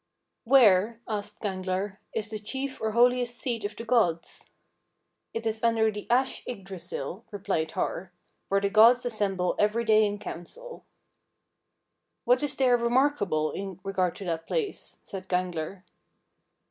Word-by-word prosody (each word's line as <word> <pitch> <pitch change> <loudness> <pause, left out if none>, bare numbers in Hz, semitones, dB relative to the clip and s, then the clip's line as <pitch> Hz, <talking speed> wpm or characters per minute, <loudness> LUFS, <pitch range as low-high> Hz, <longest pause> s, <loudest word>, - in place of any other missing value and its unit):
16. 235 - -13
"Where," 225 -3 +5
asked 210 -2 -5
Gangler, 190 0 -2
"is 220 -1 -3
the 215 - -4
chief 265 +6 -5
or 220 -1 -1
holiest 245 0 +3
seat 235 -5 -3
of 205 +1 -4
the 230 - -7
gods?" 220 -9 0 0.8
"It 225 0 -5
is 220 0 -2
under 225 -1 +3
the 210 0 -8
ash 260 +2 +1
Yggdrasill," 190 - -6
replied 180 -6 -2
Har, 180 +1 -3 0.4
"where 195 - +3
the 200 0 -1
gods 230 +4 +6
assemble 195 -6 0
every 215 +3 +2
day 215 -1 +5
in 205 0 -3
council." 470 - -9 1.4
"What 250 +1 +4
is 290 -1 -2
there 255 -2 +4
remarkable 235 - +1
in 195 -2 -6
regard 185 -3 0
to 195 - -8
that 165 -2 -3
place?" 440 -5 -3
said 190 -1 -8
Gangler. 180 0 -2
215 Hz, 145 wpm, -27 LUFS, 190-240 Hz, 1.4 s, gods